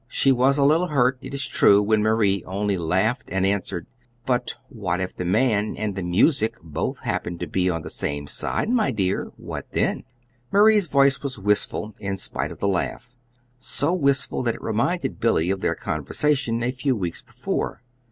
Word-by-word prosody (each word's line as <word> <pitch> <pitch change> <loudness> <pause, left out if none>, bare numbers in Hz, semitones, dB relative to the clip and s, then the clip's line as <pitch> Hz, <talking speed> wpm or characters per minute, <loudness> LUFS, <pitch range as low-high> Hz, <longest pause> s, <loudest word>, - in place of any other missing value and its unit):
She 135 +1 +3
was 135 +2 +3
a 140 - +3
little 160 +5 +3
hurt, 130 -4 +2
it - - -8
is 140 0 -2
true, 100 - +5
when 110 +1 +2
Marie 105 -3 +2
only 100 +2 -1
laughed 95 +8 0
and 95 0 +1
answered: 95 -3 -1 0.4
"But 125 -1 0
what 95 -7 -3
if 90 -1 -4
the 90 - -4
man 105 +2 +1
and 105 -2 -2
the 95 - -3
music 110 - +2
both 80 -3 -3
happen 85 0 -3
to - - -4
be 95 0 0
on 80 -2 -2
the - - -7
same 70 0 -3
side, 70 - -1
my 235 - +2
dear; 100 -6 0
what - - -7
then?" - - 0 0.5
Marie's 210 -2 +5
voice 140 -1 +3
was 135 -4 -4
wistful, 105 +1 0
in 100 -1 -3
spite - - -2
of - - -9
the 100 - -1
laugh 100 +5 -2 0.5
so 145 +5 0
wistful 140 -6 +1
that 120 -2 0
it - - -12
reminded 120 +11 -1
Billy 95 -7 +2
of 95 -1 -2
their - - 0
conversation 120 - -1
a 125 - +1
few 130 +1 -1
weeks 90 -6 -4
before. - - -4
110 Hz, 185 wpm, -23 LUFS, 95-135 Hz, 0.5 s, true